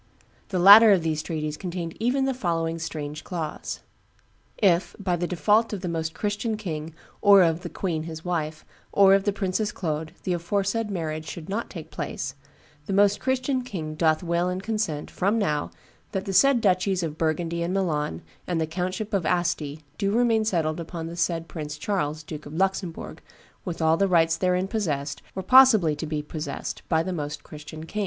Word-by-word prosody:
The 190 - -1
latter 205 +5 +10
of 185 -4 +4
these 155 -1 0
treaties 155 -2 -3
contained 175 -2 -5
even 255 +4 +1
the 270 - +1
following 165 -7 -1
strange 155 -2 -5
clause: 165 -4 -5 0.8
"If, 185 -3 +2
by 190 -4 0
default 180 +6 +2
of 200 - -4
the 185 - -3
Most 160 -1 -3
Christian 210 +1 -2
king 160 -6 -5 0.3
or 200 -2 +8
of 165 -1 +2
the 175 - -6
queen 165 -4 -2
his 160 +1 -8
wife, 155 -3 -2 0.3
or 195 -1 +6
of 195 0 +3
the 205 - +3
Princess 200 +1 -1
Claude, 160 -2 -3
the 185 - 0
aforesaid 200 +5 -1
marriage 155 -4 -3
should 160 +2 -7
not 215 +4 -2
take 165 -3 -9
place, 135 -4 -4 0.5
the - - -2
Most 205 +1 +4
Christian 260 0 0
king 170 -11 -5
doth 160 +1 +2
will 170 +1 0
and 185 +1 -3
consent, 210 -9 -2
from 200 +5 +1
now, 150 -9 0 0.4
that 190 - -2
the 195 - -3
said 260 +5 +5
duchies 185 -2 +2
of 155 -1 -4
Burgundy 165 +1 -1
and 170 +1 -1
Milan 150 - -1 0.2
and 175 -2 0
the 160 - +1
countship 185 +6 -3
of 195 -3 +1
Asti, 155 -4 -1 0.2
do 200 -2 +1
remain 230 -1 +3
settled 165 -6 0
upon 165 0 -5
the 165 +1 -6
said 165 -1 -1
Prince 150 -3 -6
Charles, 155 -4 -2
Duke 155 -1 -8
of 150 - -9
Luxembourg, 190 -2 -2 0.4
with 170 -3 -3
all 160 +1 +4
the 195 - +3
rights 165 -3 +3
therein 180 +1 +1
possessed, 145 -10 -2
or 190 - -3
possibly 225 - +6
to 160 - -4
be 150 -1 -2
possessed, 155 +1 -5
by 160 -1 +3
the 185 - -3
Most 150 -2 -4
Christian 155 +1 -9
king." 210 - -5
175 Hz, 185 wpm, -25 LUFS, 160-200 Hz, 0.8 s, latter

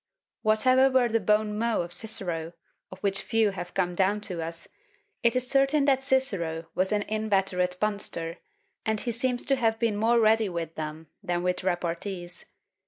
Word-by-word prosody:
Whatever 255 +5 +4
were 255 -2 +3
the 230 0 +2
bons 210 +1 +1
mots 220 -4 0
of 175 - -7
Cicero, 175 -6 -1 0.4
of - - -9
which 195 -1 +1
few 225 -2 +2
have 180 -2 -7
come 180 -2 0
down 195 +3 +1
to 180 -5 -2
us, 165 +1 -7 0.5
it 235 +1 +2
is 255 0 0
certain 275 +2 +3
that 270 -2 +3
Cicero 195 -12 0
was 185 +2 0
an 210 -1 +1
inveterate 195 -4 0
punster; 190 -5 -2 0.4
and 220 -1 0
he 235 - -2
seems 245 +1 -1
to 275 - +3
have 225 -3 +1
been 225 -2 0
more 230 +3 +3
ready 220 -1 +3
with 170 -2 -4
them 155 0 -6 0.2
than 175 0 -2
with 180 0 -1
repartees. 175 0 -3
205 Hz, 170 wpm, -27 LUFS, 175-230 Hz, 0.5 s, Whatever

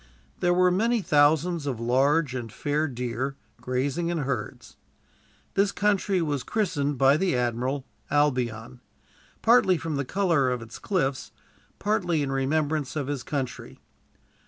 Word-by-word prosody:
There 175 - +2
were 180 0 +4
many 225 +4 +1
thousands 150 +2 +3
of 125 -5 -2
large 135 +4 +2
and 120 -4 -5
fair 150 +5 -1
deer, 125 +1 -3 0.3
grazing 135 +7 -1
in 170 - -1
herds. 135 -7 -4 0.8
This 195 0 +2
country 200 -3 +1
was 145 -4 -1
christened, 150 - -1
by 135 +2 +5
the 185 -4 +1
admiral, 125 +3 -1 0.2
Albion; 125 -5 0 0.6
partly 225 -6 +5
from 160 -2 -3
the 140 - 0
color 165 -3 +1
of 125 -2 -2
its 115 - -11
cliffs, 140 -9 -1 0.5
partly 180 -7 0
in 135 - -2
remembrance 145 +2 0
of 145 -3 -1
his 140 -1 -3
country. 135 -3 -5
145 Hz, 135 wpm, -26 LUFS, 130-175 Hz, 0.8 s, by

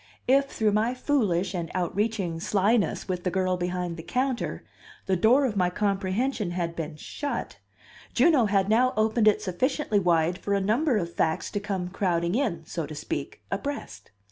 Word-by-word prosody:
If, 275 +2 +5
through 220 -6 0
my 220 +4 +1
foolish 200 - +1
and 170 -3 -3
outreaching 185 -1 -1
slyness 205 +3 +1
with 180 -2 -3
the 180 - +1
girl 185 0 +1
behind 180 -1 -3
the - - -6
counter, 250 +8 -2 0.4
the 190 - +1
door 240 +10 +4
of 230 -5 -1
my 180 -2 +2
comprehension 200 +3 -1
had 170 -1 -3
been 160 -2 -4
shut, 285 - -5 0.6
Juno 300 -9 +5
had 195 -1 +2
now 245 +4 +3
opened 220 0 +3
it 215 - +4
sufficiently 220 - 0
wide 175 -1 +2
for 200 0 -1
a - - +2
number 230 +7 +2
of 170 -3 -3
facts 160 0 0
to 205 - -1
come 195 -3 -3
crowding 175 -2 0
in, 205 - -1
so 160 -1 -4
to 155 - -8
speak, 145 -1 -5
abreast. 195 - -5
195 Hz, 170 wpm, -26 LUFS, 175-225 Hz, 0.6 s, If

